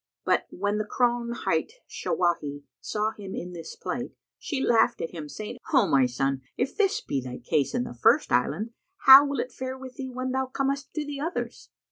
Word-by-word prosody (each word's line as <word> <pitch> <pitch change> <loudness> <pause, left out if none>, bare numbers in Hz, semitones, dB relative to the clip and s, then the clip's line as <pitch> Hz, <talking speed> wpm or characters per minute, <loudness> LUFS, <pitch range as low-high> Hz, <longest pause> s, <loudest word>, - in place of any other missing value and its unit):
But, - - +2
when 205 +2 -1
the - - +1
crone 240 +2 0
hight 335 - -1
Shawahi 150 -5 -1 0.2
saw 215 +1 -1
him 200 -3 -8
in 180 +1 -6
this 165 -2 -8
plight, - - -4 0.3
she 285 - -3
laughed 235 -1 +3
at 165 - -3
him, 155 -4 -7
saying, 210 +7 -7
"O 265 - +5
my 135 -2 +4
son, 135 +2 -1 0.2
if 250 - -1
this 405 -2 +2
be 135 - -2
thy 125 0 -6
case 135 +2 0
in - - +1
the 125 - -7
first 120 - +3
island, 150 - +1 0.3
how 270 +2 +11
will 280 0 -2
it 255 - -2
fare 260 0 -5
with 260 0 -10
thee, 265 -2 -5
when 255 +1 -3
thou 265 0 0
comest 275 +2 -2
to 305 -1 -2
the 290 -1 -5
others?" 330 +5 -4
230 Hz, 200 wpm, -27 LUFS, -, 0.3 s, how